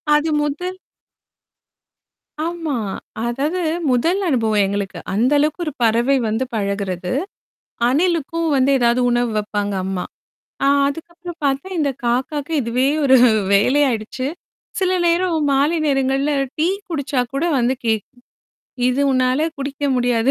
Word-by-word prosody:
அது 300 +2 +1
முதல் 355 +6 -3 1.7
ஆமா. 330 -3 -3 0.5
அதாவது 280 +9 -1 0.3
முதல் 335 +11 +1
அனுபவம் 220 -8 +2
எங்களுக்கு. 200 -1 -3 0.2
அந்த 235 +7 +2
அளவுக்கு 305 +4 0
ஒரு 305 - -3
பறவை 235 +4 +3
வந்து 220 +4 0
பழகுறது. 200 -3 -2 0.8
அணிலுக்கும் 330 +2 0
வந்து 265 0 +3
ஏதாவது 240 +1 +3
உணவு 240 0 +1
வைப்பாங்க 205 -1 -2
அம்மா. 190 -1 -2 0.6
ஆ - - +4 0.2
அதுக்கப்புறம் 340 +3 -7
பார்த்தா, 275 +6 0
இந்த 285 -3 +1
காக்காகே 270 +6 -1
இதுவே 245 +2 +1 0.2
ஒரு 265 -1 +6 0.4
வேலையாயிடுச்சு. 255 +2 +1 0.5
சில 370 -1 +1
நேரம் 340 0 +2
மாலை 285 +5 +2
நேரங்கள்ல 270 +1 +1 0.3
டீ 315 +2 +2 0.2
குடிச்சா 285 -5 -1
கூட 275 +3 -1
வந்து 245 +1 +2
கேட்கும். 225 +2 -2 0.7
இது 255 +2 0
உன்னால 255 +3 +2
குடிக்க 280 +1 -4
முடியாது. 245 0 +2
270 Hz, 120 wpm, -20 LUFS, 235-305 Hz, 1.7 s, ஒரு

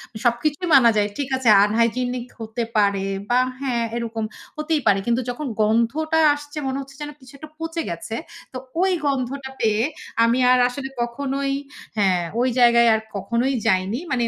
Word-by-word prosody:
এ - - -4
সবকিছুই 290 +8 0
মানা 240 -3 +7
যায়, 205 0 +2
ঠিক 280 -2 -3
আছে, 250 -4 +2
unhygenic 235 +3 0
হতে 225 +2 -4
পারে 200 -1 +2 0.2
বা 245 +1 +4 0.2
হ্যা, 265 -3 -2 0.2
এরকম 230 -1 -3 0.3
হতেই 305 -1 0
পারে। 195 -1 +4
কিন্তু 235 +2 +2
যখন 275 +4 -4
গন্ধটা 235 +9 +1 0.2
আসছে 290 +1 -10
মনে 265 +1 -2
হচ্ছে 275 0 -12
যেন 295 - -4
কিছুটা 280 +4 -12
পচে 325 0 -3
গেছে। 170 +6 -5 0.4
তো - - -4 0.2
ওই 380 0 +3
গন্ধটা 265 0 -2
পেয়ে 220 0 +2 0.4
আমি 230 +2 +3
আর 255 - +5
আসলে 270 +2 -5
কখনোই 275 +3 -2 0.5
হ্যা 205 -2 +3 0.3
ওই 255 +1 +2
জায়গায় 235 -1 +6
আর 220 - +1
কখনোই 235 +7 0
যাইনি। 190 +5 +1
মানে 240 -2 +1
245 Hz, 165 wpm, -22 LUFS, 225-275 Hz, 0.5 s, মানা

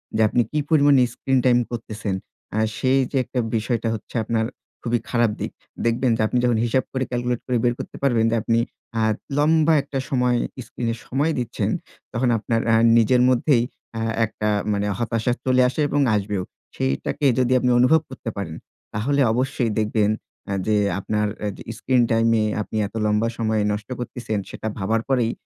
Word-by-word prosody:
যে 110 - +2
আপনি 120 - +2
কি 150 - 0
পরিমাণে 145 -4 +5
স্ক্রিন 135 +1 0
টাইম 125 -1 +5
করতেছেন। 110 -4 -4 0.4
আ - - +1 0.2
সেই 130 +1 +2
যে 140 - 0
একটা 125 - -3 0.2
বিষয়টা 115 +1 -1
হচ্ছে 110 - -8
আপনার 110 0 0 0.4
খুবই 120 0 0
খারাপ 120 -3 +2
দিক। - - -3 0.3
দেখবেন 115 +2 +2
যে - - 0
আপনি 125 - -1
যখন 120 -2 +3
হিসাব 125 +2 +1
করে 130 -1 -1
ক্যালকুলেট 120 -1 -1
করে 125 - +1
বের 120 -1 +3
করতে - - -7
পারবেন 120 -5 +3
যে - - +2
আপনি 115 +1 +1 0.4
আ - - +2 0.4
লম্বা 160 +2 +4
একটা 140 -1 -4
সময় 125 -2 +2 0.3
স্ক্রিন 120 -2 -4
এ - - -5
সময় 145 +5 +1
দিচ্ছেন। 120 -2 -2 0.4
তখন 120 +2 +1
আপনার 115 +1 -1
আ - - +6 0.2
নিজের 120 +2 +4
মধ্যেই 125 0 +3 0.4
আ - - -2 0.2
একটা 105 0 -3 0.2
মানে 100 0 0
হতাশা 115 0 0
চলে 130 -1 +4
আসে 140 - -2
এবং 145 - +1
আসবেও। 100 -2 -1 0.3
সেইটাকে 70 - -1
যদি 125 0 +2
আপনি 125 - +1
অনুভব 145 +6 +5
করতে 130 -3 -6
পারেন, 85 -5 -4 0.4
তাহলে 140 +7 +1
অবশ্যই 125 -1 0
দেখবেন 105 -1 +1 0.4
আ - - 0
যে 110 - +3 0.2
আপনার 105 +1 0
অ্যা 105 - -2
যে - - -9
স্ক্রিন 125 +1 +2
টাইম 115 0 +3
এ - - +2 0.2
আপনি 110 - -5
এত 105 - -17
লম্বা 105 +2 +2
সময় 110 -2 +1
নষ্ট 105 +2 -4
করতেছেন। 120 -3 -3
সেটা - - -6
ভাবার 110 +3 0
পরেই 125 -4 +2
120 Hz, 180 wpm, -23 LUFS, 110-130 Hz, 0.4 s, আ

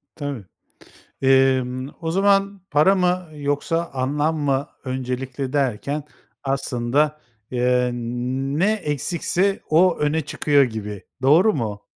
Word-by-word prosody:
Tabii, 145 -8 -5 0.8
emm, 130 -1 +3
o 165 -1 -2
zaman 195 +1 +2
para 155 +7 +5
mı 180 -2 0
yoksa 150 +4 -1
anlam 145 +4 0
mı 140 -1 0 0.2
öncelikli 130 +1 -4
derken 140 +2 -1 0.4
aslında, 135 +2 0 0.3
eee, 125 0 +2
ne 130 - -1
eksikse 180 +2 -1
o 170 +3 +4
öne 150 +2 +1
çıkıyor 145 -1 +2
gibi, 105 -5 -5 0.2
doğru 170 +11 +5
mu? 105 - -4
140 Hz, 105 wpm, -22 LUFS, 130-160 Hz, 0.8 s, para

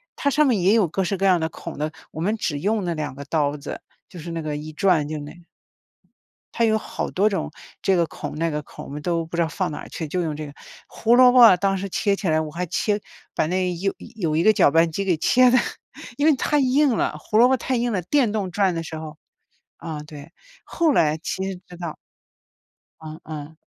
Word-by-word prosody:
它 280 - 0
上 300 0 +3
面 230 -6 +2
也 190 +4 +3
有 215 -6 +4
各 190 +4 -1
式 195 - -1
各 195 +1 +1
样 180 -2 +4
的 160 - 0
孔 - - -9
的， 150 +2 -2 0.2
我 160 - -9
们 205 +6 0
只 150 -9 -2
用 210 +2 0
那 170 -2 -2
2 150 -3 -4
个 140 +2 -8
刀 145 -1 0
子， 145 0 -7 0.3
就 175 - -10
是 170 +2 -7
那 165 -1 -3
个 150 -1 -3
一 155 +1 -8
转 170 -4 +2
就 155 -1 -4
那 145 0 -8
个 175 -1 -16 1.1
它 230 - +2
有 220 -1 +3
好 - - -5
多 205 +3 +2
种 195 - -3 0.3
这 190 -1 +3
个 170 -1 +2
孔、 - - -7
那 165 +1 0
个 150 -1 -3
孔， - - -11
我 - - -10
们 145 +1 -6
都 170 -1 -1
不 170 +1 -6
知 170 - +2
道 160 - 0
放 180 +1 -2
哪 - - -7
去， 160 - -5
就 180 +3 -1
用 155 -2 -2
这 155 -1 -6
个。 145 - -10 0.4
胡 230 +1 +2
萝 250 0 +7
卜 235 -7 +8
当 195 +1 0
时 200 - -4
切 200 +1 0
起 195 - -3
来， 155 0 +2
我 155 -1 -4
还 175 +3 -4
切 205 +5 0 0.3
把 - - +1
那 180 +1 0
有 195 +3 -1 0.2
有 160 -6 -1
一 165 - +2
个 215 - +6
搅 170 - +4
拌 165 +1 +3
机 195 +5 -3
给 180 -4 +1
切 255 +9 +4
得， 255 - +5 0.6
因 290 - +1
为 315 - +6
太 295 +3 +1
硬 265 -2 +3
了， - - -1
胡 215 - -1
萝 245 +2 +7
卜 265 - +3
太 255 +1 -2
硬 240 -1 0
了， 185 - -1
电 240 - +1
动 200 -4 -2
转 190 -1 +1
的 165 - -3
时 160 -1 -7
候 155 -1 -8 0.6
啊， 155 -2 -6
对， 150 +1 -11 0.3
后 325 -3 +1
来 155 -8 +3
切 190 +4 -3
知 180 - -12
道 170 -3 -5 1.1
嗯 155 0 -9
嗯。 155 0 -8
175 Hz, 260 characters per minute, -23 LUFS, 155-210 Hz, 1.1 s, 卜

